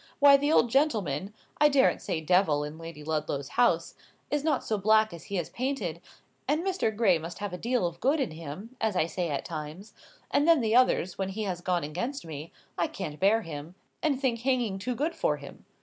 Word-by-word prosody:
Why 280 -1 +8
the 290 +2 +2
old 240 -6 +4
gentleman 210 - +1 0.3
(I 300 - +6
daren't 275 -2 +3
say 160 - -2
Devil 160 -3 +3
in 150 +2 -7
Lady 165 -2 -9
Ludlow's 150 -3 -2
house) 245 0 +2 0.4
is 295 -1 0
not 315 -1 +1
so 215 -2 -1
black 215 +1 +4
as 170 - -10
he 200 - -3
is 175 - -3
painted; 235 - -3 0.5
and 305 +4 +1
Mr. 380 - 0
Gray 200 -7 +3
must 165 +2 -7
have 205 -2 -5
a - - -3
deal 240 -2 0
of 170 0 -4
good 280 +5 +2
in 260 - -1
him, 165 - -8
as 220 -3 +1
I 170 - +3
say 170 +1 -3
at 145 - -3
times; 165 +6 -7 0.4
and 290 - +3
then 320 -8 +5
at 220 - +1
others, 240 -8 +3
when 190 0 -1
he 215 +3 -4
has 185 -3 -3
gone 175 -2 0
against 185 - -4
me, 155 0 -7 0.3
I - - +2
can't 150 0 -6
bear 215 +4 +3
him, 160 +1 -8 0.3
and 295 -5 +1
think 250 -4 0
hanging 240 -6 0
too 250 +5 -3
good 305 +7 -1
for - - 0
him. - - -12
200 Hz, 215 wpm, -28 LUFS, 165-255 Hz, 0.5 s, Why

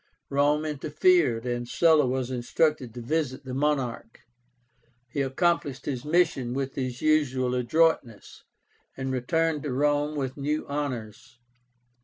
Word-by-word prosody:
Rome 145 +2 +2
interfered, 150 -4 +2
and 120 -1 -2
Sulla 160 -3 +4
was 130 0 -2
instructed 130 +1 0
to 120 - -6
visit 145 0 -2
the 130 - -6
monarch. 130 -5 -2 0.9
He 135 +4 -3
accomplished 140 0 0
his 130 -4 -3
mission 150 -6 +1
with 135 0 -2
his 130 -2 -4
usual 130 -5 +2
adroitness, 125 -2 0 0.5
and 130 0 -3
returned 150 +5 0
to 145 - -4
Rome 145 +3 +1
with 135 -2 -3
new 150 +2 -2
honors. 125 -6 -5
140 Hz, 125 wpm, -26 LUFS, 125-150 Hz, 0.9 s, Sulla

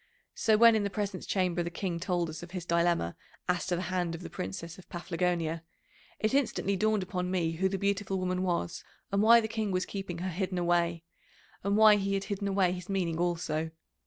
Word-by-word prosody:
So, 220 -1 +3
when 230 0 +7
in 215 - +2
the 200 - 0
Presence 200 -2 -3
Chamber 180 -3 +1
the 170 - -2
King 175 -1 -3
told 175 -1 0
us 160 - -8
of 175 - -9
his 180 -1 -5
dilemma 170 - +1 0.3
as 180 -1 0
to 180 - +1
the 175 - -2
hand 175 -2 0
of 165 - -8
the - - -8
Princess 165 - -6
of 185 - -16
Paphlagonia, 170 -2 -1 0.6
it 215 +3 0
instantly 240 -7 +1
dawned 215 0 +2
upon 180 0 -3
me 175 -3 +1
who 185 +4 0
the 195 - -2
beautiful 200 0 0
woman 185 0 -1
was, 175 - -1 0.3
and 200 0 +2
why 230 +2 +8
the 220 - -1
King 220 -1 -2
was 185 -1 0
keeping 195 -3 -5
her 185 +2 -3
hidden 185 +1 -2
away, 170 -1 +1 0.6
and 200 +1 +1
why 215 -1 +8
he 195 0 0
had 195 - -1
hidden 200 0 -3
away 190 -2 +2
his 180 0 -6
meaning 175 -4 -1
also. 165 -2 -1
185 Hz, 215 wpm, -30 LUFS, 170-200 Hz, 0.6 s, why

